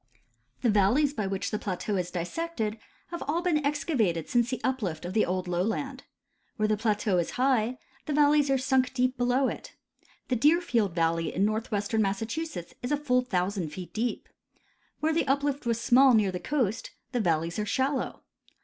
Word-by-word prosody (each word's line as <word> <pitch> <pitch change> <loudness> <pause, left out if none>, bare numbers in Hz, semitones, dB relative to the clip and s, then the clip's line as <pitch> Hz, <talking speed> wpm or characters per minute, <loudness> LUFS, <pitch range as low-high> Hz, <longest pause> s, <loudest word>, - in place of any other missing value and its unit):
The 240 - +4
valleys 230 +9 +3
by 210 -7 -2
which 195 0 -3
the 210 - -1
plateau 200 +2 -3
is 180 -2 -1
dissected 220 - -3 0.3
have 345 0 -6
all 330 +4 0
been 310 -5 +1
excavated 255 - 0
since 240 -1 +2
the 255 - -2
uplift 200 -13 -2
of 180 - -4
the 215 - +2
old 185 0 -2
lowland. 225 +10 -2 0.5
Where 215 -1 +1
the 215 - +2
plateau 210 -3 +1
is 170 - -1
high 250 -2 +2 0.3
the 300 - -1
valleys 290 0 +4
are 270 - +3
sunk 260 0 +1
deep 255 0 +1
below 250 +2 +2
it. - - -6 0.5
The 255 - +2
Deerfield 245 - +2
valley 165 -1 +1
in 195 - +1
northwestern 215 0 -1
Massachusetts 220 - -3
is 245 - -4
a 295 - +3
full 250 -4 +2
thousand 190 -6 -1
feet 180 0 -8
deep. 235 +2 -2 0.7
Where 315 +1 +2
the 325 -2 +1
uplift 280 -1 0
was 230 -1 +1
small 255 +2 +5
near 205 -3 +3
the 180 - -4
coast, 240 -6 -1 0.2
the 250 - 0
valleys 170 0 0
are 210 - -1
shallow. 265 +4 -1
235 Hz, 175 wpm, -28 LUFS, 195-270 Hz, 0.7 s, small